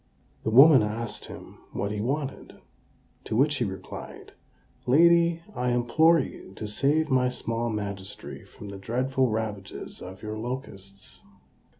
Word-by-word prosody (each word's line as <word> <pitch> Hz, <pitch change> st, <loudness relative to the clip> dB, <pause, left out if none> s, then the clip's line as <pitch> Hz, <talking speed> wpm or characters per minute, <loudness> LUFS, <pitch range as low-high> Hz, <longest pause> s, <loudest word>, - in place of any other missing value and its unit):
The -, -, -1 dB
woman 135 Hz, +3 st, +8 dB
asked 110 Hz, +2 st, -3 dB
him -, -, -11 dB
what 100 Hz, -, -2 dB
he 105 Hz, -1 st, -3 dB
wanted; 140 Hz, +4 st, -3 dB, 0.7 s
to -, -, -3 dB
which 145 Hz, +5 st, +3 dB
he 120 Hz, -, 0 dB
replied, 95 Hz, -2 st, -8 dB, 0.5 s
"Lady, 170 Hz, +4 st, +5 dB
I 125 Hz, 0 st, 0 dB
implore 120 Hz, +8 st, +4 dB
you 115 Hz, -7 st, -6 dB
to 105 Hz, -, -5 dB
save 145 Hz, +8 st, +1 dB
my 125 Hz, -1 st, +3 dB
small 115 Hz, -1 st, -2 dB
magistracy 100 Hz, -3 st, -5 dB
from 105 Hz, -, -11 dB
the 100 Hz, -1 st, -8 dB
dreadful 130 Hz, +5 st, 0 dB
ravages 105 Hz, -3 st, -4 dB
of 95 Hz, +2 st, -9 dB
your 110 Hz, 0 st, -4 dB
locusts." 100 Hz, -6 st, -7 dB
120 Hz, 135 wpm, -27 LUFS, 105-135 Hz, 0.7 s, woman